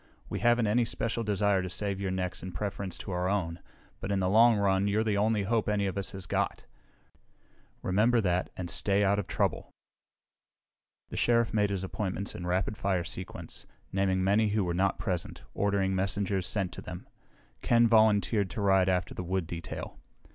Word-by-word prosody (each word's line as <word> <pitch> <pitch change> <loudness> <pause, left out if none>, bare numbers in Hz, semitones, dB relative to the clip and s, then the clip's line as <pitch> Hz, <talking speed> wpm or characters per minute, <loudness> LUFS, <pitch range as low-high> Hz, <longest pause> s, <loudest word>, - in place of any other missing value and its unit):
We - - -3
haven't 120 -1 +3
any 115 +4 +3
special 115 0 -2
desire 100 -2 +2
to 90 - -4
save 100 +1 -3
your 95 - -1
necks 95 0 -3
in 90 -1 -7
preference 100 0 -3
to 100 - -7
our 90 +1 0
own, 90 -4 -1 0.4
but 100 - -4
in 100 - +1
the 90 -1 +1
long 115 +1 +6
run 100 -1 +2
you're 105 +2 +2
the 105 -2 0
only 105 0 +2
hope 110 +1 0
any 105 -1 +1
of 95 - -2
us 100 0 -3
has 95 -1 -6
got. - - -2 1.2
Remember 110 +6 +3
that, 90 -4 0
and 90 - -4
stay 100 +3 +2
out 100 +1 +3
of 100 - -4
trouble!" - - -1 1.4
The - - -6
Sheriff 115 -1 +2
made 105 -2 +2
his 95 -2 -2
appointments 95 0 -3
in 90 - -6
rapid 95 +3 0
fire 95 -3 0
sequence, 90 +2 -7 0.3
naming 95 -1 +1
many 105 +3 +3
who 105 0 +1
were 90 -1 -1
not 95 +2 +1
present, 95 -5 -4
ordering 100 -1 +1
messengers 95 0 -1
sent 95 -2 -1
to - - -8
them. - - -8 0.5
Ken 120 0 +4
volunteered 110 -2 +3
to 105 - -5
ride 95 -2 +4
after 90 -1 0
the - - -5
wood 95 0 -1
detail. 85 0 -7
100 Hz, 185 wpm, -29 LUFS, 95-105 Hz, 1.4 s, long